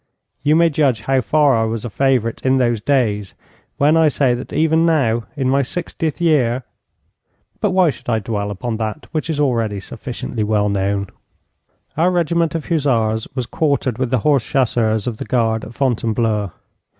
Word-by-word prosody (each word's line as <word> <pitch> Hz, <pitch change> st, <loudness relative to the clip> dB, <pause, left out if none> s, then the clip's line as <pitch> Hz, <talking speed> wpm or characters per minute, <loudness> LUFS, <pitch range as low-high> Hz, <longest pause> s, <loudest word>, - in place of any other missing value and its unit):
You 150 Hz, +2 st, +3 dB
may 165 Hz, 0 st, +4 dB
judge 140 Hz, -6 st, +1 dB
how 135 Hz, +3 st, +1 dB
far 145 Hz, +3 st, +3 dB
I 115 Hz, -, +2 dB
was 110 Hz, 0 st, -3 dB
a -, -, -3 dB
favourite 125 Hz, -1 st, 0 dB
in 130 Hz, 0 st, +3 dB
those 120 Hz, -4 st, +1 dB
days 105 Hz, -7 st, 0 dB, 0.4 s
when 150 Hz, +3 st, +4 dB
I 160 Hz, -1 st, +5 dB
say 135 Hz, -3 st, +2 dB
that 120 Hz, +1 st, -6 dB
even 160 Hz, +1 st, +2 dB
now, 130 Hz, -9 st, +2 dB
in 135 Hz, -2 st, 0 dB
my 135 Hz, +2 st, +3 dB
sixtieth 160 Hz, +2 st, -4 dB
year 135 Hz, -7 st, +2 dB, 1.0 s
but 210 Hz, -, +1 dB
why 185 Hz, -4 st, +3 dB
should -, -, -10 dB
I 115 Hz, -, +2 dB
dwell 105 Hz, -1 st, -3 dB
upon 110 Hz, +3 st, -4 dB
that 110 Hz, +5 st, -4 dB
which 155 Hz, 0 st, -3 dB
is 155 Hz, -2 st, -2 dB
already 115 Hz, -7 st, 0 dB
sufficiently 115 Hz, +2 st, -5 dB
well 105 Hz, -1 st, +1 dB
known? 100 Hz, 0 st, 0 dB, 0.9 s
Our 165 Hz, +4 st, +3 dB
regiment 170 Hz, -2 st, 0 dB
of 165 Hz, -, -4 dB
hussars 115 Hz, -9 st, +1 dB
was 130 Hz, -3 st, -2 dB
quartered 140 Hz, -4 st, -1 dB
with 130 Hz, -2 st, 0 dB
the 130 Hz, -, +2 dB
horse 140 Hz, -5 st, +3 dB
chasseurs 110 Hz, -5 st, 0 dB
of 120 Hz, -3 st, -3 dB
the -, -, -6 dB
guard 115 Hz, -3 st, 0 dB
at 115 Hz, -, -11 dB
Fontainebleau. 115 Hz, -5 st, 0 dB
125 Hz, 175 wpm, -19 LUFS, 110-150 Hz, 1.0 s, I